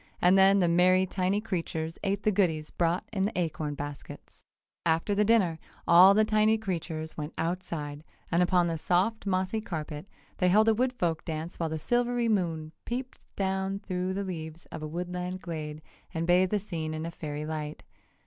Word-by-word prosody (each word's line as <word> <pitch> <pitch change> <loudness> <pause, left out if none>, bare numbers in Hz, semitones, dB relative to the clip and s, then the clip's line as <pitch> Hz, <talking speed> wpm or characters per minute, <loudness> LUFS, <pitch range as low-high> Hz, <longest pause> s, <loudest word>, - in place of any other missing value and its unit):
And 180 +2 +5
then 195 +1 +6
the 180 -3 +3
merry 180 +2 +4
tiny 190 +2 0
creatures 165 -6 -3
ate 200 +1 -1
the 215 - +3
goodies 160 -6 +1
brought 170 +1 0
in 195 - -1
the 200 +1 0
acorn 155 -3 -2
baskets. 145 0 -9 0.4
After 165 +5 +1
the 205 +1 +3
dinner 200 -7 +3 0.3
all 180 +3 +8
the 215 +1 +5
tiny 215 +1 +3
creatures 165 -6 -4
went 150 0 -5
outside, 165 -4 -3 0.3
and 170 - +3
upon 180 0 +3
the 165 -2 -2
soft, 195 +7 +1
mossy 190 +3 0
carpet 155 -4 -5 0.3
they 180 - +3
held 215 +4 +5
a 225 - +6
wood 250 +3 +1
folk 170 -9 -1
dance 160 +1 -5
while 165 -1 0
the 160 - -2
silvery 240 +5 +1
moon 165 -7 0
peeped 250 +2 -5 0.2
down 190 0 -1
through 185 -1 -3
the 200 - -1
leaves 165 -3 -6
of - - -6
the 155 - -4
woodland 180 +2 -4
glade 155 -3 -6 0.3
and 165 +1 0
bathed 180 +2 +4
the 210 - +1
scene 160 -6 -4
in 160 +1 -4
fairy 150 -2 -5
light. 155 -1 -5
180 Hz, 180 wpm, -29 LUFS, 160-195 Hz, 0.4 s, all